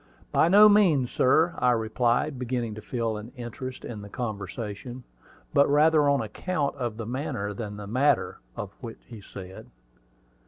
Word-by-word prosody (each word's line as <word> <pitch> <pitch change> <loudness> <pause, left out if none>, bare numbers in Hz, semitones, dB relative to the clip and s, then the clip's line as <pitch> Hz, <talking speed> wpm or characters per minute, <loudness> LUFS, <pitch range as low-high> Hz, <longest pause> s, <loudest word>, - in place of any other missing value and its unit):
"By - - +4
no 205 +4 +8
means, 175 - +4
sir," 160 +7 +3
I 125 - +3
replied, 120 +4 0
beginning 120 -3 -2
to 110 - -8
feel 115 -1 -2
an 110 +3 -9
interest 125 +1 -7
in 110 -3 -7
the 100 - -10
conversation; 110 +2 -6 0.5
but 140 0 +4
rather 150 0 +4
on 140 -2 +2
account 150 - -2
of 120 -4 -3
the 115 - -5
manner 120 -4 -3
than 105 0 -6
the 105 - -7
matter 130 +7 +1 0.2
of 100 -1 -6
what 115 -3 -7
he 115 -4 -11
said. 95 -1 -10
120 Hz, 160 wpm, -26 LUFS, 110-140 Hz, 0.5 s, no